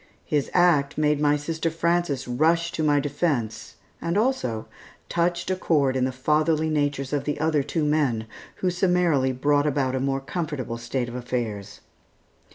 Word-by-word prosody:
His 145 Hz, -2 st, 0 dB
act 165 Hz, -6 st, +3 dB
made 150 Hz, -1 st, +2 dB
my 150 Hz, 0 st, +3 dB
sister 160 Hz, +2 st, -2 dB
Frances 165 Hz, -4 st, 0 dB
rush 165 Hz, +7 st, +2 dB
to 160 Hz, -, -3 dB
my 145 Hz, -2 st, +3 dB
defence, 140 Hz, -6 st, -2 dB, 0.3 s
and 170 Hz, +3 st, -1 dB
also, 215 Hz, -, 0 dB, 0.4 s
touched 170 Hz, +1 st, 0 dB
a -, -, +1 dB
chord 145 Hz, -7 st, +1 dB
in 130 Hz, -1 st, +2 dB
the 130 Hz, -, -1 dB
fatherly 155 Hz, +4 st, +1 dB
natures 145 Hz, -2 st, -1 dB
of 145 Hz, -2 st, -1 dB
the 145 Hz, -, -2 dB
other 155 Hz, -1 st, +2 dB
two 155 Hz, +3 st, -1 dB
men, 140 Hz, -7 st, +1 dB, 0.4 s
who 180 Hz, -, +3 dB
summarily 175 Hz, -7 st, +2 dB
brought 145 Hz, +3 st, +2 dB
about 135 Hz, -3 st, 0 dB
a 130 Hz, -, 0 dB
more 135 Hz, +1 st, 0 dB
comfortable 135 Hz, -6 st, -4 dB
state 120 Hz, +1 st, -2 dB
of 120 Hz, -, -8 dB
affairs. 110 Hz, -5 st, -4 dB
145 Hz, 165 wpm, -25 LUFS, 130-165 Hz, 0.4 s, act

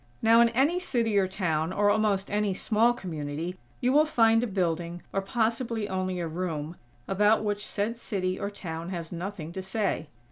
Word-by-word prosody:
Now, 230 Hz, +1 st, +7 dB
in 235 Hz, -, +5 dB
any 275 Hz, +9 st, +2 dB
city 235 Hz, -, 0 dB
or 190 Hz, -, +2 dB
town, 165 Hz, -4 st, -1 dB
or 205 Hz, +2 st, +3 dB
almost 205 Hz, -3 st, +1 dB
any 205 Hz, -2 st, +1 dB
small 225 Hz, +4 st, +3 dB
community, 165 Hz, -4 st, -4 dB, 0.3 s
you 250 Hz, +1 st, +2 dB
will 300 Hz, +2 st, +6 dB
find 225 Hz, -4 st, +4 dB
a -, -, 0 dB
building, 175 Hz, -3 st, -2 dB
or 195 Hz, -, +1 dB
possibly 230 Hz, +1 st, -1 dB
only 185 Hz, -1 st, -2 dB
a 170 Hz, -, -2 dB
room, 160 Hz, -1 st, -3 dB, 0.3 s
about 210 Hz, +3 st, +3 dB
which 205 Hz, 0 st, -2 dB
said 220 Hz, +3 st, -2 dB
city 185 Hz, -5 st, -2 dB
or 200 Hz, -, -2 dB
town 170 Hz, -4 st, -6 dB
has 170 Hz, -3 st, -5 dB
nothing 175 Hz, -2 st, -5 dB
to 190 Hz, -, -5 dB
say. 190 Hz, -5 st, -1 dB
195 Hz, 180 wpm, -28 LUFS, 175-225 Hz, 0.3 s, Now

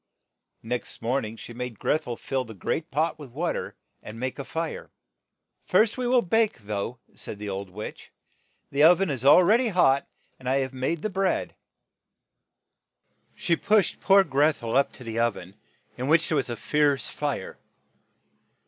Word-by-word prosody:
Next 120 Hz, +2 st, -4 dB
morn 125 Hz, +2 st, 0 dB
ing 110 Hz, +1 st, -8 dB
she 120 Hz, -, -10 dB
made 125 Hz, -2 st, -6 dB
Greth 155 Hz, +7 st, 0 dB
el 120 Hz, -, -3 dB
fill 130 Hz, +2 st, -2 dB
the 110 Hz, -3 st, -11 dB
great 155 Hz, -, -3 dB
pot 155 Hz, +4 st, 0 dB
with 145 Hz, -3 st, -9 dB
wa 160 Hz, +8 st, -2 dB
ter, -, -, -5 dB, 0.3 s
and 110 Hz, +2 st, -9 dB
make 130 Hz, +3 st, -4 dB
a -, -, -3 dB
fire. 160 Hz, +3 st, -4 dB, 0.8 s
"First 215 Hz, +4 st, +3 dB
we 250 Hz, -1 st, -2 dB
will 245 Hz, -1 st, +4 dB
bake, 220 Hz, +4 st, +2 dB
though," 105 Hz, +2 st, -4 dB, 0.2 s
said 105 Hz, -, -7 dB
the 105 Hz, 0 st, -6 dB
old 95 Hz, 0 st, -5 dB
witch. 105 Hz, +4 st, -8 dB, 0.6 s
"The 140 Hz, +2 st, +3 dB
o 170 Hz, +3 st, +8 dB
ven 190 Hz, -3 st, -1 dB
is 130 Hz, -3 st, -4 dB
al 145 Hz, +6 st, +8 dB
ready 230 Hz, +7 st, +4 dB
hot, 140 Hz, -9 st, +3 dB, 0.3 s
and 130 Hz, -, -4 dB
I 135 Hz, -, +3 dB
have 130 Hz, 0 st, -4 dB
made 135 Hz, +5 st, -2 dB
the 215 Hz, -, -1 dB
bread. 190 Hz, 0 st, 0 dB, 0.6 s
' -, -, -58 dB, 0.3 s
' -, -, -57 dB, 0.3 s
She 180 Hz, -5 st, +1 dB
pushed 205 Hz, +1 st, +2 dB
poor 195 Hz, 0 st, +6 dB
Greth 150 Hz, -2 st, +1 dB
el 115 Hz, 0 st, -2 dB
up 140 Hz, +1 st, +3 dB
to 130 Hz, -, -12 dB
the 115 Hz, -1 st, -4 dB
oven, 105 Hz, -6 st, -1 dB, 0.5 s
in 130 Hz, -, -2 dB
which 165 Hz, +2 st, +3 dB
there 155 Hz, -, +1 dB
was 135 Hz, -3 st, 0 dB
a 120 Hz, -, -4 dB
fierce 145 Hz, -2 st, +1 dB
fire. 145 Hz, -9 st, -4 dB
140 Hz, 185 wpm, -26 LUFS, 120-170 Hz, 0.8 s, o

